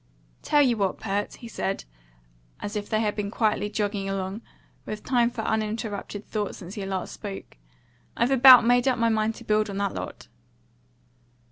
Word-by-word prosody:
"Tell 295 -1 +4
you 245 -4 +2
what, 195 -2 -1
Pert," 205 -1 -2
he 235 - -11
said, 195 -3 -3 0.8
as 205 - -5
if 205 -1 -4
they 215 -1 +1
had 210 -2 0
been 205 -1 -3
quietly 210 -1 0
jogging 205 -1 -2
along, 195 +2 -3 0.4
with 215 0 -6
time 240 -2 +2
for 240 -2 -5
uninterrupted 215 -2 -3
thought 210 -2 -3
since 185 0 -9
he 205 - -5
last 190 -2 -3
spoke, 200 -2 -8 0.6
"I've 240 +3 +2
about 255 -2 +9
made 245 +2 +3
up 255 - +2
my 230 0 +2
mind 220 0 +1
to 235 - -11
build 215 -1 +1
on 195 - -5
that 200 -1 -1
lot." - - -7
215 Hz, 175 wpm, -26 LUFS, 200-230 Hz, 0.8 s, about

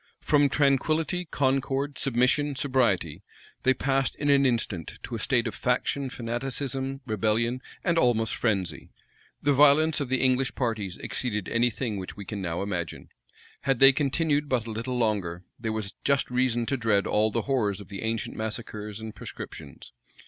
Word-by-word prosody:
From 145 -2 +3
tranquillity, 155 +6 +1
concord, 135 -1 0
submission, 135 +3 +2
sobriety, 110 - +1 0.4
they 130 0 +3
passed 135 +1 0
in 145 0 +1
an 140 -1 +5
instant 110 -9 -2
to 125 - -7
a 115 - -2
state 120 +1 +1
of 110 - -2
faction, 130 +3 0
fanaticism, 135 +3 -3
rebellion, 115 +2 0 0.2
and 170 -2 +2
almost 115 -4 +2
frenzy. 95 -8 -1 0.5
The 145 - +4
violence 150 +3 +5
of 140 -3 -3
the 130 -1 +1
English 130 0 +2
parties 110 -7 -2
exceeded 105 -6 -3
any 120 +1 +3
thing 115 -2 -3
which 95 +1 -7
we 100 - -7
can 100 0 -5
now 85 0 -2
imagine: 90 -5 -4 0.5
had 135 -2 +1
they 135 +2 +8
continued 145 +1 +1
but 125 -4 +1
a 115 - -5
little 120 +3 -3
longer, 100 -7 -1 0.2
there 115 -1 -2
was 110 -2 -3
just 140 -2 +1
reason 125 -2 +1
to 135 - -1
dread 110 -4 +2
all 105 +1 +2
the 115 +1 -1
horrors 110 -8 0
of 100 - -11
the 100 -1 -6
ancient 110 0 -2
massacres 110 -1 -4
and 110 -1 -6
proscriptions. 70 -4 -9
120 Hz, 165 wpm, -27 LUFS, 105-135 Hz, 0.5 s, they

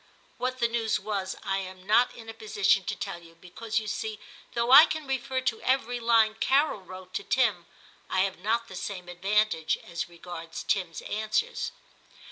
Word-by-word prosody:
(What 255 +1 -1
the 235 -2 +2
news 230 -2 0
was 195 -3 -3
I 195 -1 0
am 185 -1 -8
not 230 +5 +4
in 225 -1 -11
a 225 - -6
position 200 -3 +2
to - - -2
tell 195 -4 -5
you, 165 0 -16
because, 215 +6 -5
you 220 - -7
see, 215 0 -3 0.4
though 235 +1 +1
I 290 +5 +11
can 315 -1 -3
refer 265 0 -1
to 235 -4 -1
every 245 -2 +1
line 230 -2 +4
Carol 275 -5 +2
wrote 185 0 -11
to - - -2
Tim, 210 -10 +1 0.4
I 185 - +2
have 190 -2 -1
not 230 +4 0
the 190 - -10
same 180 0 -5
advantage 190 -1 +1
as 170 0 -5
regards 170 -1 -8
Tim's 180 -5 -1
answers.) 215 - -1
215 Hz, 180 wpm, -28 LUFS, 185-235 Hz, 0.4 s, I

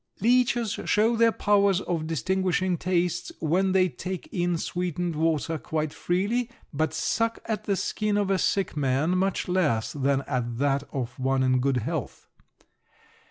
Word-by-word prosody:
Leeches 240 0 +2
show 220 +3 +3
their 230 0 +4
powers 200 -3 +3
of 165 -4 -2
distinguishing 185 +3 0
tastes 175 0 -1
when 180 +4 +1
they 185 -1 +4
take 185 +1 -6
in 175 -1 0
sweetened 175 0 -2
water 160 0 0
quite 155 -1 -2
freely, 210 +7 0 0.2
but 155 +2 0
suck 230 0 0
at 220 -3 -3
the 200 - +1
skin 210 +2 -1
of 200 -1 +1
a 190 - +2
sick 195 +1 0
man 145 +4 +1
much 190 +1 0
less 155 -12 +1
than 140 -1 +1
at 120 -3 -3
that 140 +1 +1
of 125 -1 -4
one 130 0 +1
in 130 0 +3
good 135 0 +1
health. 115 - -4
175 Hz, 155 wpm, -26 LUFS, 145-195 Hz, 0.2 s, their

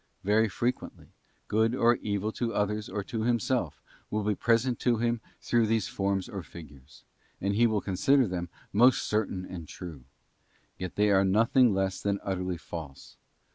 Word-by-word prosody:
Very 105 +3 +3
frequently, 120 +5 -3 0.4
good 110 +3 +2
or 120 -1 +4
evil 105 0 -2
to 115 0 -3
others 105 +1 -1
or 100 - -3
to 115 +1 -4
himself 120 - 0 0.3
will 105 0 -1
be 105 +1 +1
present 120 +4 +1
to 120 -2 +2
him 120 0 0 0.2
through 115 -2 +2
these 110 -2 +1
forms 95 -1 -1
or 100 -5 -6
figures: 75 -5 -14 0.4
and 100 +1 0
he 120 +3 +4
will 110 -2 0
consider 125 +7 +2
them 90 -2 -4 0.2
most 120 +5 +5
certain 105 -4 -1
and 85 -4 -8
true, 90 +2 -8
and 65 - -20 0.7
yet 90 -2 -5
they 105 0 +3
are 95 -1 +5
nothing 115 +5 +4
less 95 -1 -1
than 100 -1 0
utterly 90 -2 -2
false. 80 -5 -9
105 Hz, 170 wpm, -28 LUFS, 95-115 Hz, 0.7 s, most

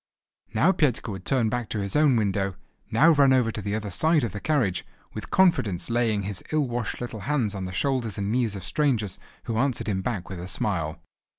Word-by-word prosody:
Now - - +5
Petka 130 - 0
would 95 -2 -7
turn 130 -5 +2
back 120 0 -3
to 110 - -1
his 100 -1 -2
own 150 -3 +4
window, 100 -3 0 0.3
now 150 +10 +5
run 140 -3 +5
over 125 -3 +3
to 105 - -5
the 100 +1 -2
other 105 -2 -4
side 160 - +3
of 115 - -1
the 105 - -6
carriage, 110 - 0 0.3
with - - -7
confidence 115 - +2
laying 115 -4 +1
his 100 -1 -2
ill 155 -3 +1
washed 120 -3 -3
little 120 -2 -5
hands 125 -9 +1
on 95 -2 -4
the 90 - -5
shoulders 120 +1 -1
and 100 0 -2
knees 115 -3 0
of 95 - -7
strangers, 120 -7 0 0.2
who 115 -1 -2
answered 130 -1 0
him 95 -3 0
back 100 -5 -3
with 95 -3 -7
a 90 - -6
smile. 85 -4 -1
110 Hz, 215 wpm, -26 LUFS, 100-130 Hz, 0.3 s, Now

